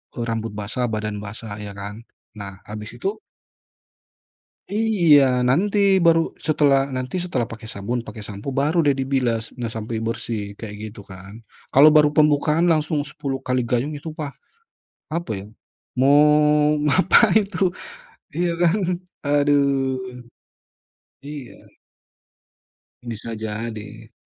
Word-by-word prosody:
eee, 120 - -3
rambut 115 0 -2
basah, 115 +4 -2
badan 105 -1 -3
basah 105 0 -8
ya 100 -1 -7
kan. 105 +2 -7 0.4
Nah, 95 -2 -8
habis 105 +2 -8
itu 195 - -2 1.5
Iya, 165 - +4
nanti 200 +9 +2 0.3
baru 165 0 +6 0.2
setelah 145 -3 +3 0.2
nanti 130 +7 -3
setelah 130 -10 -2
pakai 115 0 -9
sabun, 110 +5 -3
pakai 110 - -8
sampo, 100 +2 -8
baru 155 +5 +1
deh 145 - +4
dibilas 125 -4 -1
nggak 115 -2 -4
sampai 110 +1 -4
bersih 115 -1 -3 0.2
kayak 105 -2 -7
gitu 105 -1 -12
kan. 95 +1 -11 0.4
Kalau 145 +3 +8
baru 150 -1 +6
pembukaan 150 +2 +3
langsung 155 -1 +1
10 135 -2 -4
kali 125 0 +1
gayung, 125 +5 -1
itu 155 +3 -7
pa 155 -2 -4 0.9
apa 170 -9 -3
ya, - - -10 0.5
mau 135 +2 +5 0.7
ngapain 195 - +5
tuh, 185 +3 +2 0.7
iya 175 0 +1
kan, 175 +2 +4 0.5
aduh, 140 -2 +2 1.3
iya. 145 -4 -8 1.5
Bisa 115 -1 -6
jadi. 110 0 -6
125 Hz, 120 wpm, -22 LUFS, 110-150 Hz, 1.5 s, Kalau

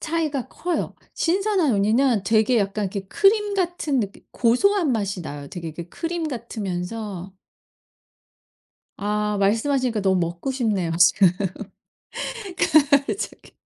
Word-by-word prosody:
차이가 305 -5 -2
커요. 350 0 -3 0.2
신선한 370 - +1
우니는 220 +3 +2
되게 220 +4 +3
약간 200 0 -1
이렇게 195 +1 -3
크림 415 - +3
같은 345 -7 0
느낌 200 -2 -5
고소한 310 - +2
맛이 200 -4 -2
나요. 145 -3 -7
되게 170 -2 -6
이렇게 165 +2 -8
크림 330 - -3
같으면서 205 - -5 1.7
아 210 +1 -1
말씀하시니까 230 +3 +1
너무 190 -1 +2
먹고 170 +9 -2
싶네요 215 -10 0
지금 195 0 +6 1.1
갑자기. 310 - +1
230 Hz, 270 characters per minute, -23 LUFS, 195-310 Hz, 1.7 s, 지금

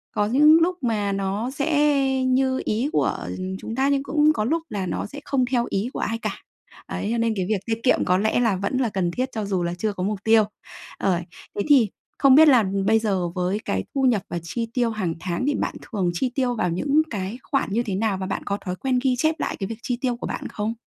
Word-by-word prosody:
có 205 - +2
những 300 +7 +6
lúc 360 +2 +1
mà 210 -4 0
nó 195 +5 -2
sẽ 280 -2 +2
như 260 0 +2
ý 235 +7 0
của - - +1 0.4
chúng 225 - -6
ta 270 +2 +2
nhưng 280 -1 +1
cũng 300 +1 +3
có 215 - -1
lúc 325 +5 0
là 195 -3 -3
nó - - -3
sẽ 285 +7 -8
không 265 -3 +1
theo 240 -2 +2
ý 200 +5 -1
của - - -4
ai 225 +2 -1
cả. 215 -3 -3 0.5
Đấy, - - -3
cho 235 - 0
nên 230 -1 +1
cái 185 -2 -1
việc 210 -3 +1
tiết 225 -1 -2
kiệm 260 - +3
có 180 +1 +3
lẽ 220 +4 +1
là 225 -5 +2
vẫn 200 +7 -2
là 250 -4 +1
cần 180 -4 -1
thiết 255 +7 -2
cho 215 -2 -3
dù 190 -3 -1
là 170 0 -1
chưa 210 +2 -1
có 185 - -4
mục 205 0 -1
tiêu. 225 -1 +5 0.5
Ờ. 180 -3 +1 0.4
Thế 205 - -1
thì 250 -8 +6 0.3
không 275 -1 +6
biết 315 +1 +8
là 250 -6 +6 0.2
bây 220 0 +5
giờ 190 -5 0
với 180 +3 -1
cái 95 0 -1
thu 270 - +1
nhập 235 -7 +3
và 175 - -3
chi 230 +7 -3
tiêu 240 -2 +1
hàng 190 -7 -2
tháng 180 +8 -2
thì 290 - +2
bạn - - -2
thường 190 -6 -2
chi 250 +8 -1
tiêu 250 -3 +1
vào 180 - 0
những 280 - +2
cái 205 +2 -4
khoản 275 - -1
như 235 +2 +1
thế 195 -4 -3
nào 205 -2 0
và 190 - -4
bạn 195 - -3
có 200 0 -1
thói 180 0 -2
quen 255 +3 0
ghi 255 -2 +2
chép 315 +3 +2
lại - - -2
cái 195 - -2
việc 225 0 -7
chi 245 -3 -1
tiêu 245 -2 0
của - - -5
bạn - - -4
không? 215 +2 -3
225 Hz, 255 wpm, -23 LUFS, 195-265 Hz, 0.5 s, biết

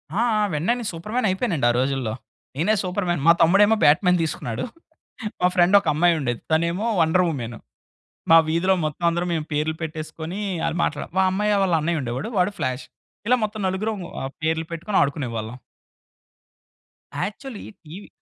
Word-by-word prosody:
ఆ! - - +1 0.2
ఆ! - - +2
వెంటనే 170 +11 +1
నె - - -5
సూపర్ 170 +7 -8
మ్యానయిపోయానండి. 190 - +1
ఆ - - -1
రోజుల్లో 130 -4 -1 0.4
నేనే 205 +8 +2
సూపర్ 185 +1 -2
మ్యాన్. 175 -5 0
మా 170 - +10
తమ్ముడేమో 200 +6 +5
బ్యాట్ 145 +5 +5
మ్యాన్ 180 0 +4
తీసుకున్నాడు. 120 -7 -3 0.8
మా 180 - +5
ఫ్రెండ్ 180 +2 +5
ఒక 190 - -9
అమ్మాయుండేది. 155 -7 +1
తనేమో 170 +6 +1 0.2
వండర్ 165 +3 +3
వుమెన్. 120 -6 -5 0.7
మా 165 - +10
వీధిలో 175 +4 +2
మొత్తం 155 +3 -3
అందరం 170 +1 -1
మేము 155 -2 -2
పేర్లు 155 +2 0
పెట్టేసుకొని 160 +3 -6 0.3
అల - - -1
మాట్లాడాం. 150 - -3
మా 190 - +5
అమ్మాయ 210 +2 +1
వాళ్ళ 180 -3 +1
అన్నయ్యుండేవాడు 150 - -2
వాడు 180 +3 +2
ఫ్లాష్. 130 +1 -2 0.4
ఇలా 250 - +5
మొత్తం 215 0 -3
నలుగురుం 205 +2 -2 0.4
పేర్లు 160 0 0
పెట్టుకొని 190 +5 -2
ఆడుకునేవాళ్ళం. 125 -6 -2 1.6
Actually 215 +4 -5 0.2
TV 180 +7 -10
170 Hz, 150 wpm, -23 LUFS, 150-190 Hz, 1.6 s, మా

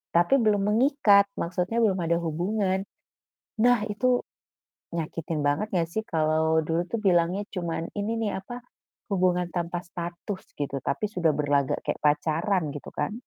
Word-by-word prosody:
tapi 175 +11 +5
belum 210 -3 +2
mengikat, 220 -5 +5
maksudnya 180 +7 -1
belum 195 -4 +2
ada 170 0 +1
hubungan. 190 +4 0 0.8
Nah 245 -3 +4
itu 245 +4 +1 0.7
nyakitin 160 -1 -3
banget 145 +9 +1
nggak 175 -4 +1
sih? 220 - 0
Kalau 160 0 +2
dulu 165 +3 -1
tuh 230 - -2
bilangnya 180 +2 +3
cuman 170 -3 -3
ini 215 +2 -2
nih 210 -4 -2
apa, 245 +5 -9 0.5
"hubungan 180 -2 +1
tanpa 175 0 -3
status" 175 +3 -6
gitu, 140 -1 -3
tapi 210 - -2
sudah 170 -5 +2
berlagak 145 -2 +1
kayak - - -2
pacaran 155 +3 +1
gitu 145 - -8
kan. 145 +6 -1
180 Hz, 145 wpm, -26 LUFS, 160-205 Hz, 0.8 s, tapi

